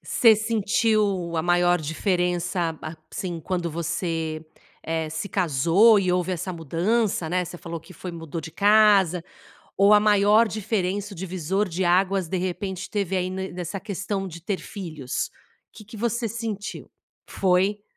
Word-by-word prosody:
Você 225 -2 +5
sentiu, 210 -4 +1
a 160 - +1
maior 175 0 +3
diferença, 175 +1 -1
a 160 +1 -6 0.2
assim, 180 -5 -4
quando 175 0 -2
você, 165 -1 -3 0.4
eh, 160 -1 -2
se 160 +6 -4
casou 180 - +4
e 185 -2 +1
houve 180 +1 0
essa 185 +1 -3
mudança, 175 - 0
né, 180 +2 0
você 175 - -8
falou 170 0 -6
que 185 - -15
foi 185 - -7
mudou 165 -1 -6
de 165 - -8
casa. 200 -3 +4 0.6
Ou 200 +1 +5
a 210 - +7
maior 210 +2 +4
diferença, 205 -1 -2
o - - -12
divisor 190 +2 -1
de 185 +1 -2
águas 185 +1 +2
de 185 - -2
repente 185 +1 -4
teve, 195 -3 -1
aí, 180 0 -1
no 190 +1 -4
nessa 180 +2 -5
questão 195 -1 -3
de 170 -1 -9
ter 190 0 -2
filhos? 155 -10 -5 0.4
Que 215 - -13
que 215 +2 -11
você 235 +1 -1
sentiu? 220 -2 -5 0.4
Foi? 195 +2 +1
185 Hz, 155 wpm, -24 LUFS, 170-205 Hz, 0.6 s, a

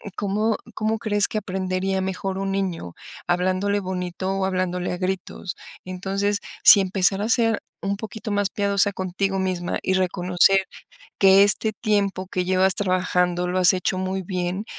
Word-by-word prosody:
cómo 210 +2 0 0.2
cómo 220 0 -1
crees 205 -2 +1
que 215 - -2
aprendería 190 0 -2
mejor 190 0 -3
un 195 0 -2
niño 185 - -3 0.3
hablándole 185 +3 +1
bonito 185 0 -4
o 190 - 0
hablándole 185 -1 -2
a 180 - -4
gritos? 185 -1 -4 0.3
Entonces, 195 +2 -2 0.3
si 200 - +9
empezar 195 +1 +1
a 220 - -2
ser 225 -2 +2 0.2
un 200 0 -1
poquito 220 +1 -7
más 205 -1 0
piadosa 200 -1 +1
contigo 190 +1 -2
misma 180 -2 -2
y 190 - 0
reconocer 185 +1 +3 0.6
que 195 0 +7
este 215 +2 +2
tiempo 200 -4 0
que 180 -1 -2
llevas 185 0 +2
trabajando 180 -2 0
lo 185 +1 -1
has 185 0 +5
hecho 185 +1 -1
muy 190 0 -2
bien, 180 +2 -3
190 Hz, 155 wpm, -23 LUFS, 185-200 Hz, 0.6 s, si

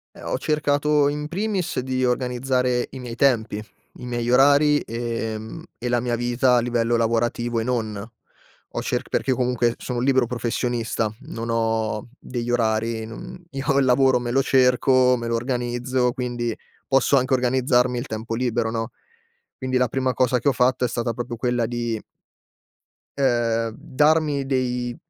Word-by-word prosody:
Eh, - - -12
ho - - -2
cercato, 150 0 +2
in 150 +1 -3
primis, 190 -2 -2
di 130 0 -1
organizzare 125 0 0
i 135 - -8
miei 120 -2 -6
tempi, 115 -5 +1 0.3
i - - -11
miei 120 -1 -2
orari, 145 +3 +5
ehm, 115 -1 -4
e 125 - -3
la 120 0 +2
mia 120 0 -1
vita 120 +1 +2
a - - +4
livello 120 -1 +1
lavorativo 115 +1 0
e - - -2
non. 115 -3 -1 0.8
Ho - - -4
cerc - - -2
perché 130 - 0
comunque 125 -2 +1
sono 125 -2 -4
un 125 - -1
libero 130 -3 +3
professionista, 120 -2 -1
non 115 -6 -6
ho 110 -1 -1
degli 120 -1 -4
orari, 110 -1 0
non 115 +10 -9
io 135 0 0
il 140 - +4
lavoro, 130 0 +4
me 120 0 -3
lo 135 +1 +3
cerco, 130 -1 +4
me 120 -1 -4
lo 115 - +1
organizzo, 125 +1 -1
quindi 120 -2 -3 0.4
posso 135 +1 +3
anche 130 +1 +1
organizzarmi 125 -1 +2
il 120 - -3
tempo 110 +1 -4
libero, 120 -2 0
no, 115 +1 -3 0.7
quindi 130 -1 -1
la 125 -1 +2
prima 130 +1 -1
cosa 125 0 +2
che 120 - -2
ho 140 - +6
fatto 125 0 +2
è - - +1
stata 120 0 -2
proprio 120 0 -5
quella 120 -1 0
di 120 -1 -2 1.2
ehm, 115 -4 +1
darmi 150 0 +1
dei 125 -2 -1
125 Hz, 165 wpm, -23 LUFS, 115-130 Hz, 1.2 s, ho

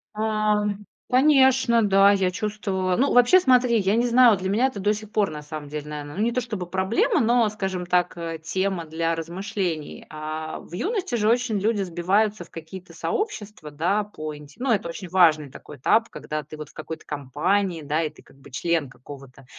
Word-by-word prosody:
А, 215 -1 +1 0.5
конечно, 260 -3 +4
да, 195 0 +5
я 195 -2 +1
чувствовала 190 -2 -2
Ну 275 +3 +2
вообще, 245 +9 +6
смотри, 250 -6 +4
я 195 +1 +1
не 240 +1 +2
знаю, 240 -3 +6
для 185 +1 -3
меня 225 +7 +3
это 260 -6 -6
до 205 +2 +2
сих 215 0 -8
пор 210 -2 +1
на 150 -1 -7
самом 150 -1 -8
деле, 150 0 -6
наверно, 145 -1 -7
ну 205 - 0
не 235 - +1
то 250 +1 -1
чтобы 210 -7 -5
проблема, 190 +4 +1
но, 235 0 +3
скажем 190 -3 -4
так, 180 0 +1
э, 165 -1 -5
тема 185 0 -2
для 165 +1 -1
размышлений. 175 -1 -4
А, 155 +1 -5
в - - -15
юности 380 - -2
же 215 -2 +2
очень 235 -3 +1
люди 210 0 0
сбиваются 190 +3 0
в 170 - -19
какие-то 165 +3 -10
сообщества, 210 - -4
да, 175 +8 0
по 155 -7 -7
инте 150 0 -14
ну 260 0 0
это 200 -6 0
очень 180 +2 -7
важный 160 -6 +4
такой 145 +1 -12
этап, 225 - +2
когда 155 0 -5
ты 155 +2 -11
вот 150 -1 -8
в - - -21
какой-то 160 +1 -8
компании, 165 +6 -1
да, 150 +3 0
и 155 - -1
ты 155 - -19
как - - -21
бы 140 - -16
член 160 +1 -1
какого-то 135 0 -13
190 Hz, 200 wpm, -24 LUFS, 155-215 Hz, 0.5 s, вообще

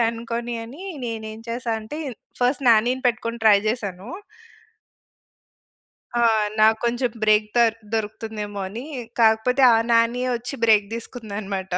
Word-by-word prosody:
అనుకోని 235 +1 -4
అనీ, 285 +12 -10 0.2
నేనేం 220 -1 -6
చేశా 235 0 -2
అంటే, 295 +8 -7 0.4
ఫస్ట్ 260 +2 +1
నాని‌ని 245 +4 +3
పెట్టుకొని 230 0 -3
ట్రై 205 -2 +7
చేశాను. 205 -3 -4 2.1
ఆ! - - +2 0.4
నాకు 220 +1 +5
కొంచెం 240 +1 0
బ్రేక్ 215 0 +4
దర్ 230 -2 +4 0.2
దొరుకుతుందేమో 215 -1 -4
అని. 230 +7 -7 0.4
కాకపోతే 225 +4 +3
ఆ - - +5
నానియే 235 +2 +2
వచ్చి 245 +4 -7
బ్రేక్ 210 -3 +4
తీసుకుందనమాట. 205 -5 -6
230 Hz, 115 wpm, -23 LUFS, 215-240 Hz, 2.1 s, ట్రై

